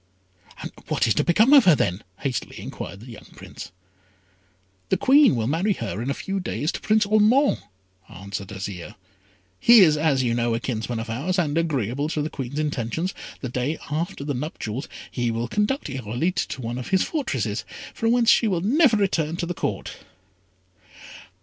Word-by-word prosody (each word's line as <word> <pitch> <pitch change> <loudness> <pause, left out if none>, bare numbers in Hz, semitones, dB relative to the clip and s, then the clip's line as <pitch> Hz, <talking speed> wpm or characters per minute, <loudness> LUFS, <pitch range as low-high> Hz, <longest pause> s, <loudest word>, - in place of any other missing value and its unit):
"And - - -6 0.2
what - - +1
is - - +3
to - - +1
become 220 +10 +4
of 275 -4 +8
her, 175 -4 +7
then?" 95 -5 -1 0.2
hastily 130 -3 -3
inquired 100 - -7
the - - -11
young 115 - -12
Prince. - - -10 1.2
"The - - +2
Queen 275 - +5
will 115 -2 -1
marry 170 - +1
her 110 - -4
in 125 - -3
a 140 - -1
few 195 0 -3
days 150 - -2
to - - -6
Prince 215 0 +3
Ormond," 215 +7 +3 0.5
answered 100 +1 -7
Azire. 100 0 -7 0.6
"He 235 -2 +8
is, 155 -5 +5
as 145 -4 +2
you 120 -2 +1
know, 120 -1 0
a - - -1
kinsman 115 -1 -3
of 115 - -5
ours; 140 - -2
and, 155 -5 0
agreeable 145 -4 -1
to 155 -2 -1
the 155 - -4
Queen's 135 0 -5
intentions, 150 - -2 0.3
the 130 - -4
day 125 +6 -2
after 155 -1 -3
the 145 0 -2
nuptials 130 -2 -5 0.2
he 120 -2 -1
will 115 +1 -2
conduct 210 - -1
Irolite 135 - -2
to 130 - -6
one 120 +2 -3
of 125 - -6
his 190 -1 +2
fortresses, 300 -5 -2 0.3
from 225 -1 0
whence 240 -1 +4
she 230 - +4
will 180 -5 0
never 250 - +4
return 165 -6 0
to 175 - -2
the 175 - -3
Court." - - -4
150 Hz, 180 wpm, -24 LUFS, 120-195 Hz, 1.2 s, of